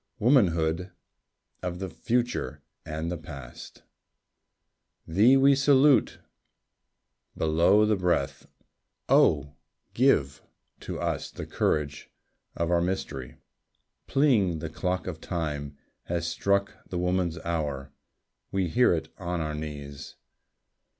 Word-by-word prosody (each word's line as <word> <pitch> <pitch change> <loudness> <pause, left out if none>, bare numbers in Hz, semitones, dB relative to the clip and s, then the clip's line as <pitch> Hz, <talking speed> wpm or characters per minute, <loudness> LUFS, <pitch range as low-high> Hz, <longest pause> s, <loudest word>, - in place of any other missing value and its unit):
Womanhood 90 - +2 0.7
of 90 -1 -3
the 95 +1 -4
future 120 +6 -2 0.2
and 80 +2 -3
the 85 - -4
past! 70 -5 -11 1.2
Thee 110 +11 +5
we 140 +1 +6
salute, 140 0 +4 1.2
below 85 +7 +4
the 105 0 +2
breath. 90 -7 -1 0.6
Oh, 70 - +3 0.4
give 75 - +2 0.4
To - - -6
us - - -2
the - - -7
courage 75 -1 -1 0.5
of 85 0 -1
our 85 -1 +3
mystery.... 75 -8 -3 0.7
Pealing, 120 - +3
the 80 +1 -6
clock 90 +2 -2
of 80 -4 -6
Time 75 -5 -4 0.3
Has 85 -1 -2
struck 100 +4 0
the 90 - -3
Woman's 90 -1 0
Hour.... 75 -5 -3 0.6
We 95 -3 0
hear 120 0 +4
it 80 - -5
on 90 -1 -3
our 75 -1 -2
knees. 70 -2 -7
85 Hz, 110 wpm, -27 LUFS, 80-100 Hz, 1.2 s, we